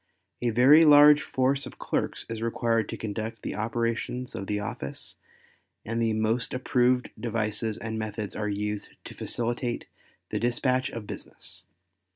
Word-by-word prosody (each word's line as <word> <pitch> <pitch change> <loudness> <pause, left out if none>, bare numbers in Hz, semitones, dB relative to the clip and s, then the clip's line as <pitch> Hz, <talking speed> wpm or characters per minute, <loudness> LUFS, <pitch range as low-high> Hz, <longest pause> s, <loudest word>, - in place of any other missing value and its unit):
A 120 - +1
very 130 +8 +7
large 150 -1 +8
force 135 +2 0
of - - -12
clerks - - -2
is 115 -1 -5
required 115 -1 0
to - - -4
conduct 110 +1 -5
the - - -3
operations 115 +3 -2
of 95 - -5
the 105 0 -1
office 100 -9 -6 0.7
and 115 +2 -1
the 115 -1 +2
most 110 +3 0
approved 125 0 +2
devices 110 -1 -2
and 110 0 -4
methods 105 -2 -4
are 105 0 -2
used 105 0 -3 0.2
to - - -8
facilitate 120 0 -2 0.5
the - - -1
dispatch 125 +2 +1
of 115 -2 -7
business. - - -9
115 Hz, 150 wpm, -27 LUFS, 110-125 Hz, 0.7 s, large